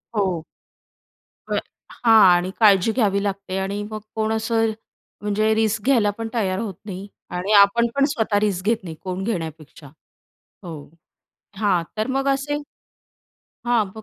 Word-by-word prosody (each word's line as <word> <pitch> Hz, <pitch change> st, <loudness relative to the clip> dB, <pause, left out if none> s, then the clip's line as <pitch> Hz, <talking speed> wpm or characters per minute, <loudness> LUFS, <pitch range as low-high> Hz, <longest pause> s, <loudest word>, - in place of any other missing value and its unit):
हो. 185 Hz, -6 st, 0 dB, 1.0 s
बरं -, -, 0 dB, 0.5 s
हां 225 Hz, -1 st, +7 dB, 0.2 s
आणि 180 Hz, +2 st, -1 dB
काळजी 205 Hz, -1 st, +5 dB
घ्यावी 200 Hz, -4 st, +1 dB
लागते 195 Hz, -1 st, -3 dB
आणि 200 Hz, +2 st, -3 dB
मग 215 Hz, -, -4 dB, 0.2 s
कोण 220 Hz, 0 st, 0 dB
असं 225 Hz, 0 st, +1 dB, 0.5 s
म्हणजे 215 Hz, +1 st, +1 dB
रिस्क 220 Hz, -1 st, 0 dB
घ्यायला 235 Hz, -7 st, +4 dB
पण 225 Hz, 0 st, -4 dB
तयार 195 Hz, -5 st, 0 dB
होत 215 Hz, -4 st, -3 dB
नाही 195 Hz, -1 st, -7 dB, 0.3 s
आणि 190 Hz, +4 st, -2 dB
आपण 235 Hz, +4 st, +4 dB
पण 280 Hz, 0 st, +4 dB
स्वतः 220 Hz, -4 st, +1 dB
रिस्क 195 Hz, -3 st, -1 dB
घेत 225 Hz, +1 st, +3 dB
नाही 165 Hz, -3 st, -7 dB
कोण 185 Hz, 0 st, -4 dB
घेण्यापेक्षा. 160 Hz, -7 st, -5 dB, 0.8 s
हो. 160 Hz, -5 st, -8 dB, 0.7 s
हां. 195 Hz, -5 st, +2 dB
तर 215 Hz, -, 0 dB
मग 275 Hz, +1 st, -1 dB
असे 275 Hz, +2 st, 0 dB, 1.1 s
हां, 240 Hz, -3 st, +3 dB
बघ 220 Hz, -, -9 dB
205 Hz, 145 wpm, -22 LUFS, 190-225 Hz, 1.1 s, हां